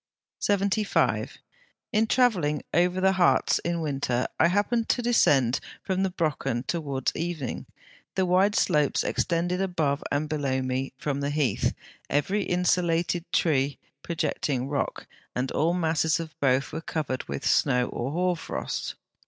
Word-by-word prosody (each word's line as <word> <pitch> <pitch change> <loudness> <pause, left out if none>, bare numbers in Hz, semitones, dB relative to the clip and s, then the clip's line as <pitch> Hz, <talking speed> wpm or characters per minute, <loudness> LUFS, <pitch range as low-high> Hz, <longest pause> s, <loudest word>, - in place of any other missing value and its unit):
75. 200 +1 +1 0.6
In 220 +1 +3
travelling 185 - +2
over 180 +2 +2
the 190 +1 +4
Harz 185 -2 +3
in 170 -1 -1
winter, 135 -5 -1
I - - +6
happened 210 +5 +1
to 245 - +1
descend 140 - +3 0.2
from 190 0 -1
the 190 - +1
Brocken 155 -9 -1
towards 140 -6 -2
evening; 165 -6 -4 0.5
the 190 - +2
wide 190 +3 +3
slopes 150 -5 +2
extending 175 +2 0
above 160 -7 0
and 145 +2 0
below 140 -4 -1
me, 130 +1 -2
the 140 -1 -1
heath, 145 -7 0 0.3
every 185 +9 +1
insulated 175 -2 0
tree 140 -4 +1 0.2
and 140 - -56
projecting 140 -5 -2
rock, 140 0 -2 0.3
and 130 +1 -1
all 165 +3 +1
masses 160 -2 +1
of 160 -1 -6
both, 135 0 +2
were 160 - -3
covered 150 -5 -3
with - - -5
snow 125 -3 +3
or 120 - -3
hoar 180 +3 +1
frost. 155 - -4
160 Hz, 140 wpm, -26 LUFS, 140-180 Hz, 0.6 s, I